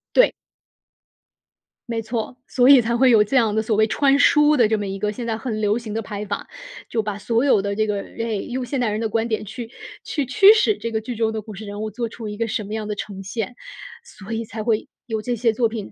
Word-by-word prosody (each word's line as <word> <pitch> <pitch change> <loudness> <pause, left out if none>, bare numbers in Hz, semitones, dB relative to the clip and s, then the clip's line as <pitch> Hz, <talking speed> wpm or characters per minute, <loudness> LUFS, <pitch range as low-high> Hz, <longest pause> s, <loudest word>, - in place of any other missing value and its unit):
对。 - - +6 1.6
没 230 -1 -1
错， 225 +2 -4
所 250 0 +3
以 275 -3 +9
才 235 +1 -1
会 255 +2 +5
有 220 -3 +6
这 265 - -3
样 225 -4 +3
的， 220 - +1
所 220 0 0
谓 220 +1 +4
“穿 275 +4 +3
书” 295 +1 +5
的 240 -6 +4
这 220 - +2
么 205 -1 -3
一 195 0 -4
个 210 +1 -1
现 235 +2 -6
在 220 -1 -1
很 220 -2 -4
流 210 +1 +1
行 225 -3 -6
的 225 - -1
拍 205 -1 -6
法。 200 0 -4 0.4
就 225 -2 -1
把 210 -1 -3
所 230 +4 0
有 260 -8 +4
的 200 0 -2
这 215 +1 +1
个 205 -1 -1
哎， 230 +1 -4
用 250 +5 -4
现 265 +2 -2
代 240 -3 +1
人 210 +1 -2
的 225 - -1
观 225 +1 0
点， 220 -2 -2
去 225 +3 -7 0.4
去 290 - -2
驱 390 - +7
使 430 -2 +2
这 230 - -4
个 220 -1 -1
剧 240 +2 -5
中 220 0 0
的 220 - -3
故 215 0 -10
事 210 +2 -8
人 205 +1 -6
物 215 0 -3
做 235 +3 -3
出 225 -1 -7
一 210 - -6
个 230 0 -1
什 215 - -2
么 205 +2 -7
样 215 -1 -3
的 210 - -3
呈 200 -1 -6
现， 220 +5 -4 0.5
所 220 - -12
以 225 0 -2
才 220 0 -6
会 220 -1 0 0.2
有 220 -2 -2
这 245 +2 -2
些 230 0 +2
作 230 +1 +1
品 220 -3 -6
225 Hz, 285 characters per minute, -22 LUFS, 210-240 Hz, 1.6 s, 以